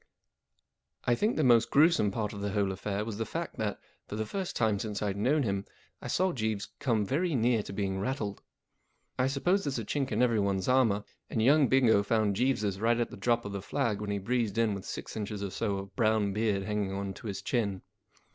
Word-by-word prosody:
And - - +2
I - - +3
think 215 - +1
the 155 - +2
most 120 -2 +5
gruesome 155 -7 +4
part 105 +1 -3
of 100 - -6
the 100 -1 -2
whole 100 -2 +1
affair 100 +2 -3
was 110 -1 -5
the - - +1
fact 170 +6 -4
that, 105 -2 -2 0.3
for - - -5
the 110 0 -2
first 190 - -4
time 110 -3 +1
since 105 -1 -3
I'd 100 -2 -1
known 135 +9 +2
him, 100 -3 -1 0.4
I - - -6
saw 185 +1 +1
Jeeves 110 -4 -2
come 115 -6 +1
very 160 - 0
near 120 -2 +3
to - - -8
being 95 -1 -2
rattled. 105 -2 -3 0.8
I 130 - +3
suppose 175 +9 +1
there's 140 -3 -2
a 115 - -3
chink 135 +3 -1
in 110 +3 +2
everyone's 100 -6 +1
armour, 115 -6 +3 0.3
and - - -2
young 140 +5 +5
Bingo 120 -6 +4
found 105 -1 +1
Jeeves's 105 -5 0
right 115 +1 +3
at 120 - -1
the - - -7
drop 120 -1 +1
of 100 - -4
the 100 -1 -4
flag 105 +2 -1
when 105 - -4
he 100 - 0
breezed 115 0 -1
in 115 -2 +2
with 100 -1 -6
six - - -6
inches 105 -1 -4
or 100 - -3
so 100 0 -1
of 95 0 -8
brown 110 -4 +2
beard 105 -2 0
hanging 105 -2 -2
on 100 0 -3
to 110 - -9
his 100 -2 -4
chin. 100 -7 -1
110 Hz, 225 wpm, -30 LUFS, 100-125 Hz, 0.8 s, most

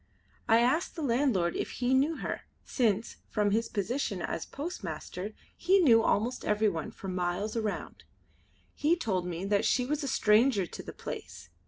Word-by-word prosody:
I 225 +1 +6
asked 260 +8 +1
the 325 - -4
landlord 235 -9 +1
if - - -3
he 250 +1 0
knew 285 +5 +3
her, - - -4 0.2
since, 225 -3 0
from 210 -2 +1
his 225 +2 +1
position 210 0 -2
as - - -3
postmaster 205 - -6 0.2
he 370 +3 +3
knew 245 -12 +6
almost 225 +3 0
everyone 210 -6 +1
for 195 - -9
miles 185 +4 -2
around. 220 -3 -3 0.7
He 315 +4 +2
told 190 - -1
me 175 +1 -4
that 200 0 +2
she 250 - +2
was 300 +3 -1
a - - -2
stranger 215 -3 +3
to - - -8
the - - -8
place. 80 - -8
225 Hz, 165 wpm, -30 LUFS, 195-265 Hz, 0.7 s, I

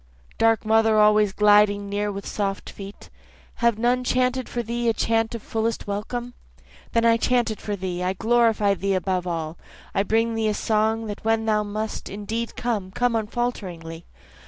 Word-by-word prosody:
Dark 225 -1 +3
mother 220 0 +4
always 210 -1 +5
gliding 205 0 +4
near 205 +1 -1
with 200 0 -7
soft 200 -1 -3
feet, 200 0 -11 0.5
Have 235 -2 +2
none 245 +2 +1
chanted 255 0 0
for 240 - -3
thee 235 +1 -1
a - - +2
chant 225 +1 0
of 230 - -7
fullest 225 0 -2
welcome? 240 +4 -4 0.6
Then 230 0 +3
I 230 0 +5
chant 240 0 +1
it 215 - -7
for 205 - -3
thee, 180 -2 -4
I 180 +1 0
glorify 225 -1 +2
thee 195 0 -1
above 185 -1 -1
all, 165 -1 -4 0.3
I - - +2
bring 225 +3 +1
thee 225 -1 0
a 210 - -1
song 220 +1 +1
that 205 -1 -6
when 225 0 +1
thou 215 -1 +2
must 210 +1 -4
indeed 220 +3 -4
come, 220 -6 -2
come 245 +4 0
unfalteringly. 195 -8 -4
215 Hz, 175 wpm, -24 LUFS, 200-230 Hz, 0.6 s, always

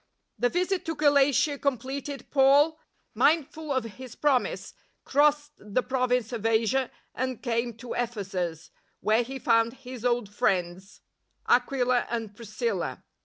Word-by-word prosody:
The 245 - +3
visit 365 +3 0
to 325 -1 -2
Galatia 285 -1 +3
completed, 275 +1 -3
Paul, 285 +3 +4 0.3
mind 305 -2 +3
ful 315 -2 -7
of 260 -3 +1
his 240 +2 -10
promisCj 275 -4 0 0.3
crossed 295 +1 +2
the 210 +4 -1
Province 250 -2 0
of 225 -3 -4
Asia 225 +3 +2 0.2
and 255 -1 -3
came 235 -2 -1
to 240 +1 -7
Ephesus, 190 -8 -3 0.3
where 220 +2 +3
he 265 +3 -5
found 230 -3 +2
his 255 -3 -10
old 240 -3 +1
friends, 190 -4 -1 0.5
Aquila 250 0 +2
and 225 -3 -4
Priscilla. 230 - -3
250 Hz, 130 wpm, -27 LUFS, 230-280 Hz, 0.5 s, Paul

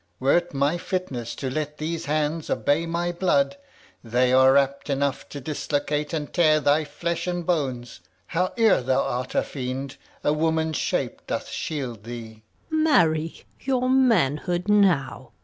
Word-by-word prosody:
Were't 170 +6 +2
my 145 +5 +1
fitness 135 -12 -4
To 130 -2 -4
let 150 +1 -3
these 160 +1 -3
hands 150 +2 -1
obey 160 +4 +1
my 170 +1 -1
blood, 235 +11 +1 0.5
They 125 +2 +2
are 130 +1 +6
apt 140 +1 0
enough 140 -1 -1
to 145 - -7
dislocate 150 +1 -2
and 155 -3 -4
tear 155 -4 +4
Thy 150 +1 +2
flesh 170 +4 -3
and 175 -1 -2
bones. 130 - -2 0.3
Howe'er 185 - +2
thou 130 +1 +1
art 125 +1 -3
a - - +3
fiend, 130 0 -5 0.3
A 150 - +2
woman's 160 0 0
shape - - -2
doth - - -3
shield 125 -8 -4
thee. 115 -2 -8
150 Hz, 130 wpm, -24 LUFS, 130-165 Hz, 0.5 s, are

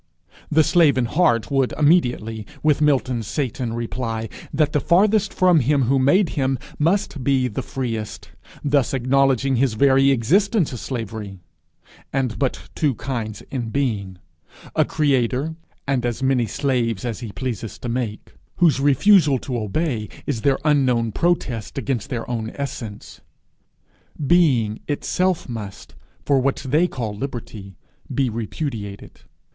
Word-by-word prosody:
The 155 +1 +4
slave 160 -4 +4
in 125 - +2
heart 135 -4 +1
would 135 -2 +1
immediately, 120 -9 +1 0.2
with 150 -1 +3
Milton's 130 -6 +1
Satan, 130 -4 -2
reply, 115 -1 -3 0.2
that 150 +1 +1
the 150 - +3
farthest 200 +5 +3
from 180 -3 +4
him 140 +1 +2
who 135 +3 +2
made 155 +8 +4
him 135 -2 0 0.2
must 165 -3 0
be 130 -1 +2
the 105 - -4
freest, 115 -5 -5 0.3
thus 140 -2 +2
acknowledging 135 0 +2
his 125 -3 +1
very 135 +3 +4
existence 170 - +2
a 125 - -5
slavery, 110 -5 -5 0.7
and 130 -4 -1
but 135 -3 -2
two 145 -6 0
kinds 110 -5 -4
in 120 -4 -3
being 105 -8 -2 0.6
a - - +4
creator, 140 0 +1 0.3
and 135 -3 0
as 120 +1 -2
many 130 -3 +2
slaves 120 -7 -1
as 115 -3 -3
he 115 -4 -6
pleases 115 -3 -5
to - - -7
make, 115 -3 -4 0.2
whose 165 -6 +3
refusal 145 +1 +5
to 125 0 -5
obey 110 - -2 0.2
is 125 -6 -2
their 135 +1 +2
unknown 125 -6 +2
protest 140 -7 -1
against 135 -2 -2
their 120 -4 -4
own 115 -2 -3
essence. 120 -7 -6 1.0
Being 130 -10 +3
itself 180 +4 0
must, 105 -4 -7 0.3
for 140 -2 +3
what 135 +2 -1
they 155 +7 +3
call 115 -9 -4
liberty, 110 -5 -7 0.4
be 135 -4 0
repudiated! 110 -2 -5
130 Hz, 140 wpm, -22 LUFS, 115-145 Hz, 1.0 s, refusal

